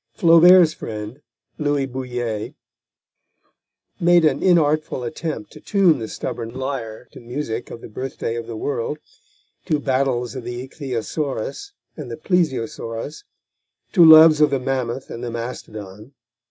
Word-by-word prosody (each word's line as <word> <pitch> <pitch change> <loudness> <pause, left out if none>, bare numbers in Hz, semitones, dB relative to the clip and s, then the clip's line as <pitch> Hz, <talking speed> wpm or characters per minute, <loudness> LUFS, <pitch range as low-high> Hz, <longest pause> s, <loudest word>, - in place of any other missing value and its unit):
Flaubert's 170 -1 +7
friend, 110 +5 -7 0.4
Louis 145 -2 0
Bouilhet, 125 -4 -4 1.4
made 175 -1 +4
a 150 - +4
inartful 155 -5 +1
attempt 155 +5 -5
to - - -13
tune 185 -8 +3
the 110 - -5
stubborn 115 +1 -6
lyre 125 -4 -5
to - - -12
music 120 -1 -5
of 115 - -9
the - - -9
birthday 120 0 -5
of 115 -1 -5
the 115 -2 -6
world, 145 +3 -3 0.7
to 155 - 0
battles 130 -3 0
of 130 -3 -6
the 120 +2 -6
ichthyosaurus 135 - -4 0.2
and 145 -6 -8
the 115 - -6
plesiosaurus, 140 - -2 0.7
to 175 - +6
loves 160 -1 +9
of 150 - +6
the 140 -1 0
mammoth 130 -1 -3
and 120 - -7
the 120 - -3
mastodon. 110 -1 -8
130 Hz, 135 wpm, -21 LUFS, 115-155 Hz, 1.4 s, loves